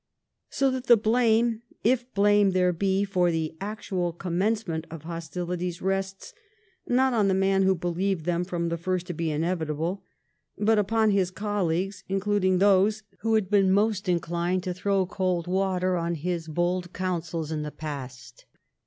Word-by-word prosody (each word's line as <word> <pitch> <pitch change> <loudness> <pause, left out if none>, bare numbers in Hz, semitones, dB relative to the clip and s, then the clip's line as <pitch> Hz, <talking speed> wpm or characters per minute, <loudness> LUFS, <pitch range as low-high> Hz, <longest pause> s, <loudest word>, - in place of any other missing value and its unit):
So 270 -1 +1
that 255 -1 -4
the 235 - +8
blame, 225 +1 +2 0.2
if 245 +2 +1
blame 205 -1 +4
there 180 -1 +3
be, 195 +3 +1
for 185 -3 +1
the 160 -1 -2
actual 195 -4 -3
commencement 180 -1 -2
of 165 -2 -9
hostilities 175 +1 -4
rests, 195 0 -3 0.5
not 260 +1 +3
on 215 -4 +3
the 190 - +2
man 195 0 +2
who 190 0 +3
believed 175 0 -2
them 175 0 0
from 175 -2 -2
the 170 0 -3
first 180 +1 -2
to 175 - -5
be 165 0 -2
inevitable, 165 +2 -2 0.6
but 215 +1 +3
upon 220 +1 +2
his 195 -3 +2
colleagues, 195 -1 -2
including 195 -1 +1
those 205 +2 +3 0.2
who 225 -1 +1
had 215 -3 +1
been 195 -2 +4
most 205 -1 +1
inclined 175 +1 0
to 185 -1 -2
th^ow 190 +1 0
cold 185 -3 -1
water 185 0 0
on 170 0 -1
his 170 +1 -3
bold 175 +2 -1
counsels 170 -3 -3
in 155 -1 -2
the 150 - -4
past. 130 -5 -8
185 Hz, 160 wpm, -26 LUFS, 170-205 Hz, 0.6 s, the